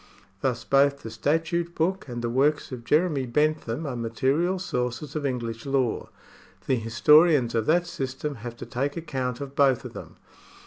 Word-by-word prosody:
Thus 120 -3 -1
both 140 +2 +3
the 115 - -6
statute 165 +8 -1
book 180 +1 0
and 120 -2 -5
the 120 - 0
works 145 +4 +1
of 125 -2 -6
Jeremy 150 -1 +1
Bentham 150 +1 0
are 135 -4 -3
material 135 +10 0
sources 130 -4 -3
of 145 -2 -1
English 115 -3 -4
law. 135 -4 -1 0.6
The 130 - +2
historians 125 +4 +4
of 115 -2 0
that 175 +3 +3
system 135 -3 -4
have 120 +1 -7
to - - -7
take 135 +6 -2
account 130 -5 -3
of 140 0 -7
both 135 -3 +3
of - - -7
them. - - -10
135 Hz, 170 wpm, -26 LUFS, 120-155 Hz, 0.6 s, historians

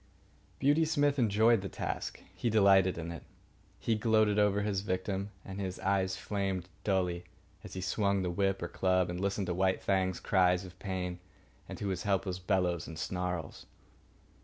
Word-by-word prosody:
Beauty 145 +4 +3
Smith 145 -3 +2
enjoyed 110 0 +4
the 95 - -5
task. - - -4
He 120 - -1
delighted 100 -4 +5
in 85 0 -4
it. 85 - -7 0.6
He 115 - 0
gloated 110 -1 +3
over 105 0 +3
his 100 -2 0
victim, 95 +1 -2 0.2
and 95 +1 -6
his 95 -1 -4
eyes 95 -1 +1
flamed 95 -2 -2 0.2
dully, 90 -3 0 0.4
as - - -9
he 95 - -3
swung 100 +1 +1
the 90 - -1
whip 95 0 0
or - - -1
club 95 0 +1
and 90 +1 -4
listened 100 0 0
to 90 - -1
White 95 +1 +1
Fang's 95 -2 +1
cries 90 -1 +2
of 90 0 -13
pain 90 -2 -3 0.5
and - - -6
to 100 - -3
his 95 -2 -2
helpless 95 -3 0
bellows 90 -3 0
and 80 - -8
snarls. 90 -3 -4
95 Hz, 170 wpm, -32 LUFS, 90-100 Hz, 0.6 s, delighted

